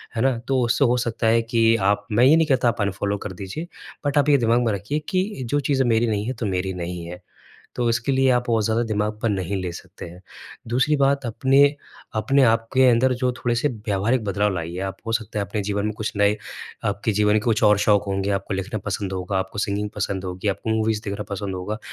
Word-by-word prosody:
है 115 Hz, -, -1 dB
ना? 130 Hz, -2 st, +2 dB
तो 130 Hz, +2 st, 0 dB
उससे 120 Hz, +4 st, +2 dB
हो 125 Hz, 0 st, +2 dB
सकता 115 Hz, -2 st, -1 dB
है 115 Hz, +1 st, +4 dB
कि 115 Hz, 0 st, +2 dB, 0.2 s
आप 105 Hz, 0 st, -2 dB
मैं 115 Hz, +4 st, +4 dB
ये 145 Hz, +4 st, +7 dB
नहीं 160 Hz, -1 st, +3 dB
कहता 130 Hz, -4 st, +2 dB
आप 120 Hz, -2 st, 0 dB
अनफ़ॉलो 100 Hz, +1 st, -1 dB
कर 100 Hz, -1 st, -7 dB
दीजिए 100 Hz, -, -6 dB, 0.4 s
बट 145 Hz, +1 st, 0 dB
आप 145 Hz, 0 st, +3 dB
ये 145 Hz, -, +6 dB
दिमाग 120 Hz, 0 st, +2 dB
में 110 Hz, -, +1 dB
रखिए 105 Hz, +10 st, -2 dB
कि 185 Hz, 0 st, +2 dB, 0.2 s
जो 145 Hz, +5 st, 0 dB
चीज़ें 135 Hz, -2 st, +1 dB
मेरी 115 Hz, 0 st, +2 dB
नहीं 105 Hz, -2 st, -1 dB
है 130 Hz, -, -1 dB
तो 115 Hz, -, -2 dB
मेरी 95 Hz, -1 st, -1 dB
नहीं 85 Hz, 0 st, -5 dB
है। 90 Hz, +1 st, -9 dB, 0.5 s
तो 120 Hz, -1 st, 0 dB
इसके 115 Hz, +4 st, 0 dB
लिए 130 Hz, 0 st, +3 dB
आप 125 Hz, -1 st, +2 dB
बहुत 115 Hz, -2 st, +1 dB
ज़्यादा 110 Hz, +2 st, +1 dB
दिमाग 105 Hz, -1 st, -1 dB
पर 115 Hz, -, +1 dB
नहीं 95 Hz, -1 st, -2 dB
ले 90 Hz, -, -3 dB
सकते 85 Hz, -, -10 dB
हैं। 85 Hz, +1 st, -12 dB, 0.5 s
दूसरी 130 Hz, +6 st, +2 dB
बात 140 Hz, 0 st, +2 dB
अपने 130 Hz, +5 st, +3 dB, 0.5 s
अपने 135 Hz, +5 st, +3 dB
आपके 115 Hz, +3 st, +3 dB
अंदर 125 Hz, +2 st, +4 dB
जो 125 Hz, -1 st, +2 dB
थोड़े-से 120 Hz, +2 st, 0 dB
व्यावहारिक 110 Hz, 0 st, -1 dB
बदलाव 100 Hz, +1 st, 0 dB
लाइए 85 Hz, 0 st, -4 dB
आप 95 Hz, -, -7 dB
हो 115 Hz, -, -2 dB
सकता 110 Hz, -2 st, -2 dB
है 100 Hz, -, 0 dB
अपने 105 Hz, +1 st, -3 dB
जीवन 100 Hz, 0 st, -2 dB
में 110 Hz, -, -1 dB
कुछ 110 Hz, -, -3 dB
नए 100 Hz, +1 st, +3 dB, 0.5 s
आपके 105 Hz, +2 st, -1 dB
जीवन 105 Hz, 0 st, +2 dB
के 110 Hz, -, +3 dB
कुछ 110 Hz, -2 st, +1 dB
और 105 Hz, -1 st, +5 dB
शौक 105 Hz, -2 st, +3 dB
होंगे 100 Hz, 0 st, -1 dB
आपको 100 Hz, 0 st, -2 dB
लिखना 95 Hz, +4 st, -3 dB
पसंद 100 Hz, 0 st, -4 dB
होगा, 95 Hz, +1 st, -2 dB
आपको 95 Hz, +2 st, -4 dB
सिंगिंग 100 Hz, +1 st, -1 dB
पसंद 100 Hz, -2 st, -3 dB
होगी 90 Hz, +2 st, -3 dB
आपको 100 Hz, +3 st, -2 dB
मूवीज़ 110 Hz, -1 st, +1 dB
देखना 100 Hz, 0 st, -4 dB
पसंद 100 Hz, -1 st, -4 dB
होगा। 95 Hz, +4 st, -4 dB
110 Hz, 235 wpm, -23 LUFS, 100-120 Hz, 0.5 s, ये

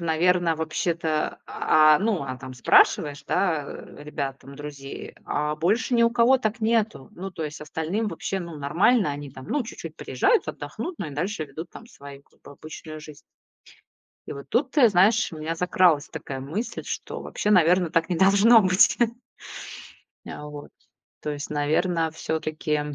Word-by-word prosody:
наверно, 170 Hz, +1 st, +2 dB
вообще-то, 160 Hz, 0 st, -2 dB
а 155 Hz, -1 st, +4 dB
ну, 210 Hz, -4 st, 0 dB
она 130 Hz, -2 st, -5 dB
там 130 Hz, 0 st, -9 dB
спрашиваешь, 140 Hz, +3 st, +3 dB
да, 160 Hz, -7 st, +1 dB, 0.3 s
ребят, 140 Hz, -2 st, -5 dB
там, 140 Hz, 0 st, -12 dB
друзей: 145 Hz, -1 st, -8 dB
"А 150 Hz, +1 st, -1 dB
больше 205 Hz, +10 st, +1 dB
ни 235 Hz, -, +4 dB
у 230 Hz, -, +4 dB
кого 240 Hz, +2 st, +4 dB
так 225 Hz, -1 st, -2 dB
нету?" 220 Hz, -, 0 dB
Ну, 190 Hz, +2 st, -6 dB
то 165 Hz, -, -6 dB
есть 150 Hz, 0 st, -6 dB
остальным 160 Hz, +8 st, -2 dB
вообще, 195 Hz, 0 st, -3 dB
ну, 170 Hz, -3 st, -7 dB
нормально. 170 Hz, -, +2 dB
Они 145 Hz, -1 st, -7 dB
там, 130 Hz, 0 st, -11 dB
ну, 290 Hz, -3 st, 0 dB
чуть-чуть 225 Hz, -, -9 dB
приезжают, 475 Hz, -, +1 dB
отдохнут, 350 Hz, -2 st, -6 dB
ну, 170 Hz, -, -3 dB
и -, -, -7 dB
дальше 165 Hz, +4 st, -3 dB
ведут 155 Hz, +4 st, -9 dB
там 230 Hz, -, -12 dB
свою 140 Hz, -, -12 dB
как -, -, -33 dB
бы -, -, -13 dB
обычную 155 Hz, +1 st, -9 dB
жизнь. 150 Hz, -1 st, -11 dB, 1.1 s
И -, -, -5 dB
вот 140 Hz, 0 st, -9 dB
тут, 260 Hz, +3 st, 0 dB
ты 255 Hz, -6 st, +6 dB
знаешь, 205 Hz, +3 st, +3 dB
у -, -, -7 dB
меня 160 Hz, +2 st, -3 dB
закралась 175 Hz, -3 st, +2 dB
такая 140 Hz, -4 st, -6 dB
мысль, 170 Hz, -, -4 dB
что -, -, -5 dB
вообще, 210 Hz, -, -2 dB
наверное, 180 Hz, -2 st, +4 dB
так 165 Hz, +1 st, +1 dB
не 175 Hz, -, -1 dB
должно 200 Hz, +5 st, +6 dB
быть. 185 Hz, +2 st, +4 dB, 1.3 s
Э, -, -, -7 dB
вот. 150 Hz, -1 st, -9 dB, 0.5 s
То 150 Hz, -, -3 dB
есть, 145 Hz, 0 st, -5 dB
наверно, 160 Hz, +3 st, +1 dB
всё-таки, 155 Hz, -1 st, -2 dB
160 Hz, 165 wpm, -25 LUFS, 150-200 Hz, 1.3 s, ты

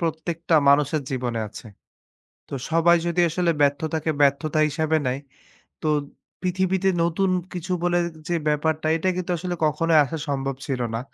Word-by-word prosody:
প্রত্যেকটা 165 Hz, 0 st, 0 dB
মানুষের 145 Hz, +1 st, +3 dB
জীবনে 120 Hz, -3 st, -2 dB
আছে। 115 Hz, -, -11 dB, 0.8 s
তো -, -, -6 dB, 0.2 s
সবাই 165 Hz, +1 st, +5 dB
যদি 170 Hz, +1 st, +1 dB
আসলে 170 Hz, +1 st, +1 dB
ব্যর্থতাকে 155 Hz, +2 st, +1 dB
ব্যর্থতা 145 Hz, +2 st, +2 dB
হিসেবে 160 Hz, +1 st, 0 dB
নেয়, 130 Hz, +2 st, -1 dB, 0.6 s
তো 155 Hz, -, 0 dB, 0.5 s
পৃথিবীতে 185 Hz, +1 st, 0 dB, 0.2 s
নতুন 185 Hz, +3 st, +1 dB, 0.2 s
কিছু 180 Hz, +1 st, -4 dB
বলে 175 Hz, 0 st, +2 dB, 0.3 s
যে 175 Hz, -, +1 dB
ব্যাপারটা 155 Hz, +1 st, 0 dB
এটা 165 Hz, +3 st, -1 dB
কিন্তু 185 Hz, 0 st, -3 dB
আসলে 180 Hz, +1 st, -3 dB
কখনোই 155 Hz, +1 st, +3 dB
আসা 155 Hz, +4 st, -5 dB
সম্ভব 135 Hz, -1 st, -1 dB
ছিল 135 Hz, -4 st, -2 dB
না। 115 Hz, -, -1 dB
160 Hz, 145 wpm, -24 LUFS, 145-175 Hz, 0.8 s, সবাই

